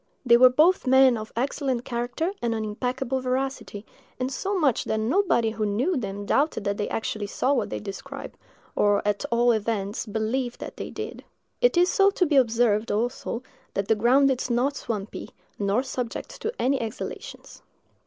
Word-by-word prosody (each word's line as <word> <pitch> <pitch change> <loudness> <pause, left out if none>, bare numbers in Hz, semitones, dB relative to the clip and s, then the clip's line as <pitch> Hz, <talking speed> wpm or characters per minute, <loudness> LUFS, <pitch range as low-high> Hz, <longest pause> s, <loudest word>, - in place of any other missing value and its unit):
They 235 -1 +7
were 255 +1 +8
both 310 +4 +3
men 265 -1 +6
of 215 0 -6
excellent 260 0 -1
character 245 +8 -2
and 235 -1 0
unimpeachable 250 +4 -2
veracity, 255 -5 -3 0.3
insomuch 275 - 0
that 220 - -1
nobody 235 - +2
who 220 0 -3
knew 230 - 0
them 205 -5 -4
doubted 280 -2 +1
that 200 0 -1
they 205 - -2
actually 215 -2 -3
saw 260 +6 0
what 225 -6 0
they - - -4
described, 275 +8 -8 0.4
or, 205 -1 +3
at 205 +6 0
all 240 +1 +3
events, 215 -1 -2
believed 230 +4 -2
that - - -8
they - - -5
did. - - -7 0.4
It - - +4
is 355 +1 +3
to 390 -2 +4
be 295 - +1
observed, 230 -4 +3
also, 235 +2 -2 0.3
that 195 0 -2
the - - +6
ground 260 +6 +4
is 255 0 -2
not 250 +4 +1
swampy, 215 -6 -5 0.3
nor 205 +5 +1
subject 250 -3 -5
to 445 - -1
any 270 +1 +1
exhalations. 225 -2 -7
240 Hz, 165 wpm, -25 LUFS, 215-270 Hz, 0.4 s, were